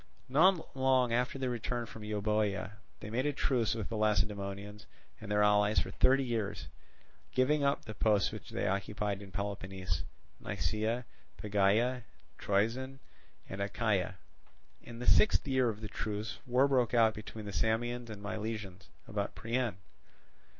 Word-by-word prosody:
Not 165 Hz, +6 st, +3 dB
long 130 Hz, -2 st, +3 dB
after 125 Hz, +3 st, +1 dB
their 130 Hz, -2 st, -1 dB
return 120 Hz, 0 st, -2 dB
from 110 Hz, -, -10 dB
Euboea, 105 Hz, -1 st, 0 dB, 0.3 s
they 105 Hz, -, -7 dB
made 130 Hz, +5 st, 0 dB
a 145 Hz, -, 0 dB
truce 120 Hz, -4 st, +1 dB
with 110 Hz, -3 st, -4 dB
the 115 Hz, -, -3 dB
Lacedaemonians 105 Hz, -2 st, -1 dB, 0.3 s
and 110 Hz, -, -9 dB
their 105 Hz, 0 st, +3 dB
allies 105 Hz, 0 st, +4 dB
for -, -, +1 dB
thirty 135 Hz, +1 st, +4 dB
years, 115 Hz, -5 st, -3 dB, 0.6 s
giving 140 Hz, +3 st, +3 dB
up 140 Hz, 0 st, +1 dB
the 110 Hz, -, -6 dB
posts 105 Hz, -2 st, +2 dB
which -, -, -8 dB
they -, -, -2 dB
occupied 100 Hz, +1 st, -1 dB
in 100 Hz, -2 st, -11 dB
Peloponnese—Nisaea, 100 Hz, -, -3 dB, 0.3 s
Pegae, 105 Hz, +5 st, +2 dB, 0.4 s
Troezen, 115 Hz, +7 st, 0 dB, 0.5 s
and 95 Hz, +1 st, -5 dB
Achaia. 100 Hz, -2 st, 0 dB, 0.6 s
In 120 Hz, -1 st, -10 dB
the 125 Hz, -, -5 dB
sixth 210 Hz, -, +5 dB
year 130 Hz, -3 st, +3 dB
of 110 Hz, -1 st, -5 dB
the 110 Hz, -, -4 dB
truce, 105 Hz, +2 st, -4 dB
war 130 Hz, +3 st, +4 dB
broke 125 Hz, -4 st, +2 dB
out 110 Hz, -2 st, +5 dB
between 105 Hz, +1 st, -8 dB
the 100 Hz, -, -6 dB
Samians 115 Hz, +5 st, 0 dB
and 105 Hz, -2 st, -8 dB
Milesians 105 Hz, -3 st, -5 dB, 0.2 s
about 105 Hz, -2 st, -3 dB
Priene. 120 Hz, -2 st, -1 dB
110 Hz, 145 wpm, -32 LUFS, 105-125 Hz, 0.6 s, sixth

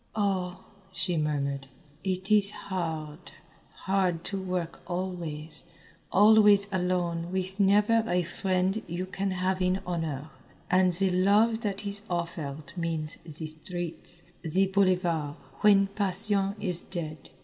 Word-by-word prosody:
"Oh," 190 Hz, -3 st, -1 dB, 0.3 s
she 180 Hz, 0 st, -1 dB
murmured, 140 Hz, -3 st, -1 dB, 0.4 s
"it 190 Hz, +1 st, -2 dB
is 205 Hz, -2 st, +5 dB
hard, 165 Hz, -5 st, -5 dB, 0.5 s
hard 185 Hz, -3 st, +1 dB
to 195 Hz, -1 st, -3 dB
work 180 Hz, -3 st, -3 dB
always 175 Hz, -4 st, -4 dB, 0.5 s
always 210 Hz, -1 st, +6 dB
alone 175 Hz, -2 st, -1 dB
with 190 Hz, +1 st, -3 dB
never 210 Hz, +3 st, +4 dB
a 180 Hz, -2 st, +2 dB
friend 185 Hz, +3 st, 0 dB
you 175 Hz, +2 st, -3 dB
can 195 Hz, +1 st, -3 dB
have 185 Hz, 0 st, -1 dB
in 185 Hz, +1 st, +2 dB
honour, 155 Hz, -4 st, -3 dB, 0.4 s
and 185 Hz, 0 st, +5 dB
the 190 Hz, +2 st, +3 dB
love 210 Hz, +5 st, +3 dB
that 205 Hz, -1 st, -3 dB
is 200 Hz, 0 st, -1 dB
offered 160 Hz, -4 st, -4 dB
means 165 Hz, -3 st, -2 dB
the 160 Hz, 0 st, -5 dB
streets, 175 Hz, +2 st, -4 dB, 0.2 s
the 185 Hz, +4 st, +2 dB
boulevard 180 Hz, -6 st, +1 dB, 0.3 s
when 200 Hz, -2 st, +6 dB
passion 200 Hz, 0 st, 0 dB
is 180 Hz, -4 st, +2 dB
dead. 155 Hz, -5 st, -6 dB
185 Hz, 125 wpm, -28 LUFS, 165-195 Hz, 0.5 s, always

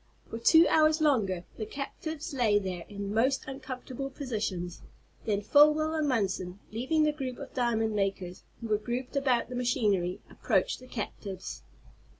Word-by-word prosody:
For 225 Hz, -, -4 dB
two 320 Hz, +8 st, +7 dB
hours 310 Hz, 0 st, +4 dB
longer 215 Hz, -, +2 dB
the 215 Hz, -, -3 dB
captives 310 Hz, +5 st, -5 dB
lay 230 Hz, -6 st, +3 dB
there, 185 Hz, -4 st, -3 dB
in 200 Hz, 0 st, -5 dB
most 255 Hz, +5 st, +2 dB
uncomfortable 265 Hz, 0 st, -6 dB
positions. 210 Hz, -, -4 dB, 0.4 s
Then 205 Hz, -2 st, 0 dB
Folwell 300 Hz, +6 st, +5 dB
and 310 Hz, -2 st, 0 dB
Munson, 190 Hz, -7 st, -1 dB
leaving 260 Hz, +8 st, +1 dB
the 305 Hz, -, +3 dB
group 265 Hz, -4 st, -5 dB
of -, -, -9 dB
diamond 225 Hz, -3 st, +1 dB
makers 195 Hz, -3 st, -2 dB, 0.2 s
who 230 Hz, -, -5 dB
were 210 Hz, -1 st, +2 dB
grouped 245 Hz, +5 st, -4 dB
about 255 Hz, -4 st, +2 dB
the 250 Hz, -, -5 dB
machinery, 205 Hz, -7 st, +1 dB
approached -, -, 0 dB
the 255 Hz, -, -13 dB
captives. 195 Hz, -, -6 dB
240 Hz, 150 wpm, -29 LUFS, 200-275 Hz, 0.4 s, two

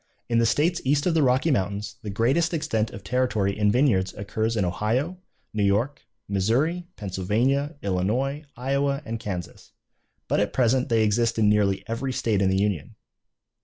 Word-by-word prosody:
In 115 Hz, -1 st, +3 dB
the 115 Hz, -, +3 dB
states 170 Hz, +8 st, +1 dB
east 145 Hz, +2 st, +1 dB
of 180 Hz, -, +2 dB
the 160 Hz, -, +3 dB
Rocky 130 Hz, +4 st, +3 dB
mountains 100 Hz, -1 st, -2 dB
the 105 Hz, -, -6 dB
greatest 135 Hz, -, +1 dB
extent 115 Hz, -9 st, -1 dB
of 100 Hz, -, -10 dB
territory 105 Hz, -6 st, 0 dB
in 105 Hz, -1 st, +2 dB
vineyards 105 Hz, -7 st, +2 dB
occurs 110 Hz, +3 st, -2 dB
in 100 Hz, -, +2 dB
Ohio, 120 Hz, -, -1 dB, 0.3 s
New 110 Hz, -, -1 dB
York, 105 Hz, +8 st, +1 dB, 0.3 s
Missouri, 130 Hz, -, 0 dB
Pennsylvania, 115 Hz, -, 0 dB
Illinois, 115 Hz, +10 st, -1 dB
Iowa, 140 Hz, +3 st, 0 dB
and 115 Hz, 0 st, -4 dB
Kansas, 90 Hz, -5 st, -7 dB, 0.5 s
but -, -, +1 dB
at 105 Hz, -, 0 dB
present 125 Hz, +1 st, +2 dB
they 115 Hz, -1 st, +3 dB
exist 115 Hz, +2 st, +1 dB
in 105 Hz, -2 st, +4 dB
nearly 100 Hz, -2 st, +2 dB
every 125 Hz, +3 st, -3 dB
state 110 Hz, -5 st, 0 dB
in 95 Hz, -, +3 dB
the 95 Hz, -, +1 dB
Union. 100 Hz, -6 st, -1 dB
115 Hz, 165 wpm, -25 LUFS, 100-135 Hz, 0.5 s, in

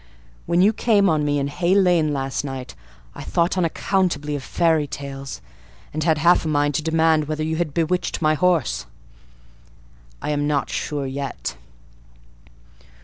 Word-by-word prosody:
When 170 Hz, +1 st, +3 dB
you 210 Hz, +3 st, +4 dB
came 210 Hz, -3 st, +3 dB
on 155 Hz, -2 st, +1 dB
me 145 Hz, 0 st, +1 dB
in 140 Hz, 0 st, 0 dB
Hay 175 Hz, +6 st, +1 dB
Lane 175 Hz, -6 st, +3 dB
last 135 Hz, -1 st, -2 dB
night, 135 Hz, -2 st, -6 dB, 0.4 s
I -, -, -9 dB
thought 170 Hz, +2 st, 0 dB
unaccountably 170 Hz, -4 st, 0 dB
of 145 Hz, -, -4 dB
fairy 160 Hz, 0 st, +1 dB
tales, 135 Hz, -1 st, -7 dB, 0.5 s
and 155 Hz, +1 st, -2 dB
had 160 Hz, -1 st, +2 dB
half 170 Hz, +3 st, +4 dB
a -, -, -3 dB
mind 145 Hz, -1 st, +1 dB
to 145 Hz, -, 0 dB
demand 160 Hz, -1 st, +2 dB
whether 155 Hz, 0 st, -2 dB
you 160 Hz, +1 st, -1 dB
had 170 Hz, -3 st, -1 dB
bewitched 170 Hz, +4 st, -1 dB
my 155 Hz, -1 st, +3 dB
horse: 170 Hz, -4 st, +1 dB, 1.3 s
I -, -, -3 dB
am 145 Hz, 0 st, 0 dB
not 145 Hz, -2 st, 0 dB
sure 145 Hz, -2 st, -3 dB
yet. 135 Hz, +1 st, -4 dB
155 Hz, 155 wpm, -22 LUFS, 145-170 Hz, 1.3 s, you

